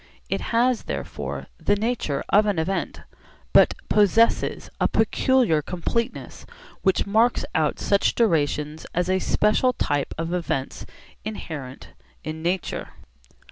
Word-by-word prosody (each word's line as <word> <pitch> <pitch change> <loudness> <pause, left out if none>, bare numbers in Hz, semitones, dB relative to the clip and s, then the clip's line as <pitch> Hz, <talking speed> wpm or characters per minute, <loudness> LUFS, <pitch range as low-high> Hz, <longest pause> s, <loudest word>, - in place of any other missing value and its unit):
It - - -1
has 240 +1 +2
therefore - - -5
the 205 - +2
nature 215 - -1
of 210 +1 +4
an 205 -4 0
event, 185 +4 -2 0.5
but - - +6
possesses 215 +2 +3
a - - +3
peculiar 250 - +2
completeness 230 - -3 0.4
which 190 -2 +2
marks 225 +4 +2
out 155 -3 +1
such 200 -1 +2
durations 155 -7 0
as 180 +1 +1
a 190 - +2
special 215 +7 +2
type 145 - -1
of 165 +2 -3
events 160 -6 -3 0.4
inherent 150 -11 -7 0.3
in 155 +1 -5
nature. 175 +2 -2
190 Hz, 120 wpm, -24 LUFS, 160-220 Hz, 0.5 s, but